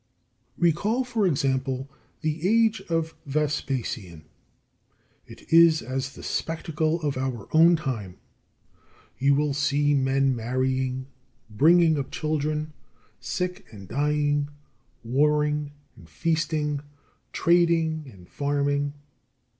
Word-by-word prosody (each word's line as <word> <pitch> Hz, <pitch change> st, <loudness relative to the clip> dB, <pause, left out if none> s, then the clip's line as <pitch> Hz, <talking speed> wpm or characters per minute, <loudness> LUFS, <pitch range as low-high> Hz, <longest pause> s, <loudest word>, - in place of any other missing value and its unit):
32. -, -, -20 dB
Recall, 205 Hz, +9 st, +2 dB
for 230 Hz, -5 st, 0 dB
example, 135 Hz, -3 st, -1 dB, 0.3 s
the 160 Hz, +3 st, -1 dB
age 225 Hz, 0 st, +3 dB
of 165 Hz, -1 st, -1 dB
Vespasian. 130 Hz, -, -2 dB, 1.0 s
It -, -, -10 dB
is 165 Hz, -1 st, +6 dB
as 130 Hz, +3 st, -4 dB
the -, -, -11 dB
spectacle 160 Hz, 0 st, -1 dB
of 145 Hz, -3 st, -1 dB
our 130 Hz, -5 st, -3 dB
own 165 Hz, +2 st, +6 dB
time. 115 Hz, -, -4 dB, 1.0 s
You 140 Hz, +1 st, +4 dB
will 145 Hz, 0 st, +1 dB
see 145 Hz, +1 st, +1 dB
men 135 Hz, -1 st, +2 dB
marrying, 130 Hz, +2 st, -1 dB, 0.5 s
bringing 160 Hz, +6 st, +4 dB
up 135 Hz, -, -4 dB
children, 155 Hz, 0 st, -2 dB, 0.5 s
sick 180 Hz, 0 st, -4 dB
and 100 Hz, -4 st, -11 dB
dying, 145 Hz, +2 st, 0 dB, 0.5 s
warring 150 Hz, +4 st, +1 dB, 0.3 s
and -, -, -16 dB
feasting, 155 Hz, -3 st, -1 dB, 0.5 s
trading 165 Hz, -3 st, +2 dB
and 90 Hz, -4 st, -16 dB
farming. 145 Hz, 0 st, -1 dB
145 Hz, 105 wpm, -25 LUFS, 135-160 Hz, 1.0 s, is